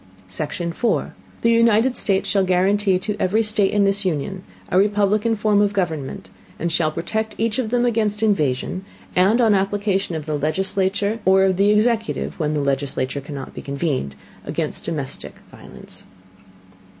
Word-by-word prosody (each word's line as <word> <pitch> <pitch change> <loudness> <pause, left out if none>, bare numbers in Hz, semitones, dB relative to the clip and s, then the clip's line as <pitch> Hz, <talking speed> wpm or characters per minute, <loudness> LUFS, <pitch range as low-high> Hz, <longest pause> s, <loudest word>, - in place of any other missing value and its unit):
Section 155 - -3
4. 235 +6 -1 0.3
The 230 - +4
United 230 +2 +4
States 195 -2 0
shall 195 -1 +2
guarantee 190 +1 +2
to 205 +3 -3
every 215 +5 +2
State 210 -2 +1
in 205 -1 +2
this 200 +1 +2
Union 185 +2 -2 0.3
a 185 - +3
Republican 210 +2 +2
Form 210 -1 +2
of 205 0 +1
Government, 160 -8 -3 0.3
and 170 +1 -2
shall 160 -2 +1
protect 220 +7 -3
each 225 +1 0
of 235 -4 -1
them 245 +1 +1
against 215 -2 0
Invasion; 175 -3 0 0.3
and 195 +6 +4
on 225 -3 +4
Application 195 -2 0
of 155 -2 -5
the 155 -2 -2
Legislature, 190 +6 0
or 190 +1 +5
of 190 -1 +2
the 200 +1 +4
Executive 220 0 +1
(when 155 -1 0
the 150 - 0
Legislature 140 0 -1
cannot 140 -1 -8
be - - -7
convened) 140 - -2 0.3
against - - -4
domestic 140 -5 -5 0.2
Violence. - - -12
195 Hz, 160 wpm, -21 LUFS, 160-210 Hz, 0.3 s, or